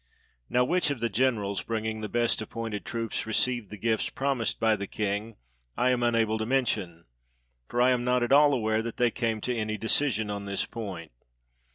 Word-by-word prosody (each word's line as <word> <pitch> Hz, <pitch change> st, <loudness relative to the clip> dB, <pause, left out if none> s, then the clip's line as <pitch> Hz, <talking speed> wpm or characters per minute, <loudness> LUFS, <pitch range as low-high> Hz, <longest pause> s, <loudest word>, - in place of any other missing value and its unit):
Now 125 Hz, 0 st, +3 dB
which 175 Hz, +2 st, +1 dB
of 140 Hz, -4 st, -2 dB
the 115 Hz, -, 0 dB
generals, 105 Hz, -3 st, 0 dB
bringing 110 Hz, -1 st, -3 dB
the 105 Hz, -, -4 dB
best 120 Hz, +1 st, +1 dB
appointed 110 Hz, -2 st, -5 dB
troops, 115 Hz, -1 st, -3 dB
received 120 Hz, -1 st, 0 dB
the 105 Hz, -, -8 dB
gifts 110 Hz, +2 st, 0 dB
promised 135 Hz, -4 st, -1 dB
by 110 Hz, -1 st, +3 dB
the 100 Hz, -1 st, -5 dB
king, 105 Hz, +2 st, -3 dB, 0.4 s
I 125 Hz, +1 st, +3 dB
am 125 Hz, -1 st, +1 dB
unable 115 Hz, -2 st, +2 dB
to 110 Hz, -, -1 dB
mention; 100 Hz, -10 st, -1 dB, 0.6 s
for 120 Hz, -, -2 dB
I 125 Hz, +1 st, +5 dB
am 125 Hz, -1 st, +1 dB
not 125 Hz, 0 st, +2 dB
at 120 Hz, -, -1 dB
all 145 Hz, +1 st, +7 dB
aware 110 Hz, -4 st, +1 dB
that 115 Hz, 0 st, -6 dB
they 120 Hz, -1 st, +3 dB
came 115 Hz, -2 st, -1 dB
to 125 Hz, +2 st, -1 dB
any 110 Hz, -1 st, -2 dB
decision 110 Hz, -2 st, +1 dB
on 100 Hz, 0 st, -4 dB
this 100 Hz, 0 st, -1 dB
point. 95 Hz, -8 st, -7 dB
115 Hz, 195 wpm, -28 LUFS, 105-125 Hz, 0.6 s, all